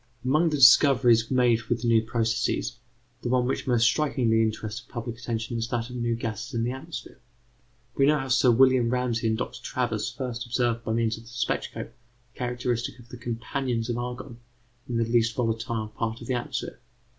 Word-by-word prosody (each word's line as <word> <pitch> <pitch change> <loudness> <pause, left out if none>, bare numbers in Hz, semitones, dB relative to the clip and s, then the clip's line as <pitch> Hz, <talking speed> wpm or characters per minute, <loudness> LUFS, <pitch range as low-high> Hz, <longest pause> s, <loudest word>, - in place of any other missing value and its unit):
Among 155 +6 +3
the 150 - -1
discoveries 125 -3 +6
made 125 -3 +3
with 120 -1 0
the - - 0
new 115 -1 +5
processes, 115 +2 -1 0.4
the 120 - -3
one 125 0 +2
which 130 - -2
most 120 -3 +3
strikingly 120 -5 +2
interested 110 0 -3
public 120 -1 -6
attention 115 -1 -3
is 115 - -2
that 120 0 -3
of - - -7
new 120 -1 0
gases 115 +2 -5
in 115 - 0
the 120 - 0
atmosphere. 130 +2 -8 0.8
We 135 - +4
know 150 +1 +4
how 135 -1 -4
Sir 130 0 +4
William 130 0 +5
Ramsay 125 -2 0
and 110 0 +1
Dr. 125 - -5
Travers 120 -5 -2
first 125 -3 -4
observed 120 -1 0
by 110 - -2
means 115 -1 0
of 115 - -13
the - - -13
spectroscope 120 0 -3 0.4
the - - -21
characteristics 125 -1 -2
of 120 -1 -16
the 125 - -9
companions 120 0 -3
of 120 - -2
argon 125 0 -6 0.5
in 120 - -1
the 115 - +2
least 115 0 +2
volatile 115 -2 -2
part 110 +1 -3
of 120 - -9
the 130 - -1
atmosphere. 130 +1 -4
120 Hz, 190 wpm, -26 LUFS, 115-125 Hz, 0.8 s, discoveries